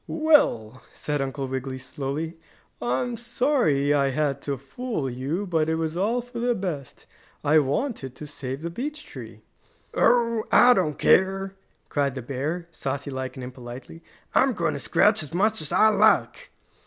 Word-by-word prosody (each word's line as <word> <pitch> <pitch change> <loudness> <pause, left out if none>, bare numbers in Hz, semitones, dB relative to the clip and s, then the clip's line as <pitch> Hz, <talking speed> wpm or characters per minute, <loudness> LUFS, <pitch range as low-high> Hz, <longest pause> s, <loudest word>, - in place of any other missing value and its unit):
"Well," 130 - +2
said 145 -1 -3
Uncle 135 0 -3
Wiggily 130 0 -4
slowly, 140 +5 -5 0.4
"I'm 130 - -1
sorry 235 - +1
I 140 -1 +2
had 140 0 -1
to 140 -1 -3
fool 235 - -4
you, 135 +10 -3
but 160 -4 0
it 160 - +1
was 160 0 -2
all 220 +7 +1
for 240 0 -8
the 240 0 +1
best. 165 - -5 0.4
I 150 +2 +5
wanted 145 - -2
to 150 - -8
save 140 -1 -6
the 170 - -3
beech 295 - -5
tree." - - -10 0.5
"Oh, 230 -2 +3
I 250 0 +7
don't 165 -9 0
care!" 195 +1 +3 0.3
cried 140 -2 0
the 130 - -5
bear, 150 +7 -3
saucy 140 -1 -4
like 130 0 -5
and 130 - -6
impolitely. 125 -7 -9 0.3
"I'm - - +4
going - - 0
to - - -4
scratch - - +3
as 155 +2 -6
much 215 +1 +2
as 155 - -6
I 200 +5 +5
like!" - - +3
155 Hz, 165 wpm, -25 LUFS, 135-215 Hz, 0.5 s, I